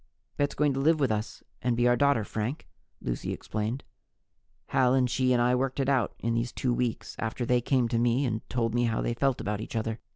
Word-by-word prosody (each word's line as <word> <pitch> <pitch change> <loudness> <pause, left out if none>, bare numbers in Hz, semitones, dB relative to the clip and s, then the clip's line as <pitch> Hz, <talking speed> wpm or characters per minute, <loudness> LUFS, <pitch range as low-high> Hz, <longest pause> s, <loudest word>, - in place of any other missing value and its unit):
"Bet's 145 0 0
going 150 -2 +2
to 135 - -2
live 155 +3 +3
with 135 -5 +2
us 110 +1 -3 0.2
and 120 -1 0
be 120 0 +3
our 120 - +5
daughter, 140 -4 +3
Frank," 110 +9 -4 0.4
Lucy - - -3
explained. 110 +5 -3 0.9
"Hal 125 0 +3
and 130 -1 +3
she 130 +1 +1
and 125 - +3
I 120 +1 +3
worked 130 +2 0
it 135 - +1
out 130 -6 +1
in 115 +1 -1
these 115 +1 -1
two 125 -2 -1
weeks, 120 -2 -2
after 115 +2 -2
they 125 0 +2
came 125 0 +2
to 115 - +1
me 120 +3 +2
and 110 -3 -1
told 115 -2 0
me 120 0 +2
how 115 -1 0
they 120 - 0
felt 135 +1 +1
about 105 +1 -2
each 110 - -7
other. 115 0 -2
120 Hz, 230 wpm, -28 LUFS, 115-130 Hz, 0.9 s, our